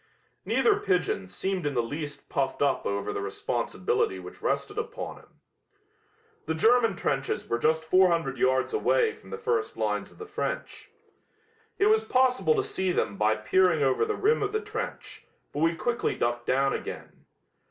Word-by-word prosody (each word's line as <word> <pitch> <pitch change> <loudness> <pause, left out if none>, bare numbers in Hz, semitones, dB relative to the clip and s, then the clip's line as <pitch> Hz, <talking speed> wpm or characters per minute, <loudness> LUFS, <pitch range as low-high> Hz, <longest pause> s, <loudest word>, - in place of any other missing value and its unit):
Neither 420 -3 +3
pigeon 180 - 0
seemed 185 - -3
in 145 - -2
the 120 - +2
least 145 +4 -6
puffed 135 +1 -1
up 140 - +1
over 100 0 -2
the - - -3
responsibility 95 -1 -1
which 90 -1 -10
rested - - -1
upon - - -5
him. - - -21 1.1
The 160 - 0
German 230 +3 +4
trenches 135 -5 -2
were 120 - -1
just 160 +3 +1
400 170 -5 +3
yards 130 +1 +2
away 445 +1 +2
from - - -16
the 460 - -5
first 455 -1 -1
lines - - -1
of - - -19
the 440 - -8
French. 425 +2 -4 0.9
It 395 - +3
was 440 +1 +4
possible 260 - +3
to 405 - +1
see 190 - -1
them 100 - 0
by 110 +2 +2
peering 180 -2 +3
over 135 -1 +2
the 435 - -1
rim 435 +3 +2
of 410 0 -1
the 435 - +1
trench, 430 +1 -6 0.3
but 145 - -3
we 165 +2 +2
quickly 235 +7 -1
ducked 120 0 -1
down 135 +1 +2
again. - - -7
170 Hz, 170 wpm, -27 LUFS, -, 1.1 s, German